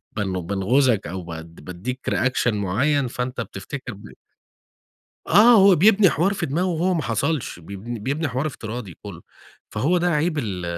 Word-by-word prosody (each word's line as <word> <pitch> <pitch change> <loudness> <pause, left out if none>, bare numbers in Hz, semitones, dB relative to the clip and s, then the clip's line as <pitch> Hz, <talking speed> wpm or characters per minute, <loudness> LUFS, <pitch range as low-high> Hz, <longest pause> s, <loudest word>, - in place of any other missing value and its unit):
بن 95 -3 -2
بانغُزَك 110 +4 +2
أو 95 +1 -5
بد 80 0 -9
بادِّيك 105 +9 -5
reaction 130 -3 +1
مُعين 125 +9 0
فأنت 125 0 -4
بتفتكر 125 +5 -7
ب 100 +1 -13 1.2
آه، 215 +7 +7
هو 195 -1 +7
بيبني 200 +1 +5
حوار 175 +7 +1
في 175 -4 -2
دماغه 170 +7 -1
وهو 180 +1 0
ما 160 - -1
حصلش 125 - -2
بيبن 100 +7 -8
بيبني 140 +8 -2
حوار 130 +4 -2
افتراضي 110 - -6
كلّه 95 -5 -9 0.5
فهو 175 +6 +1
ده 175 - 0
عيب 155 0 0
ال 95 -8 -3
125 Hz, 155 wpm, -22 LUFS, 100-160 Hz, 1.2 s, آه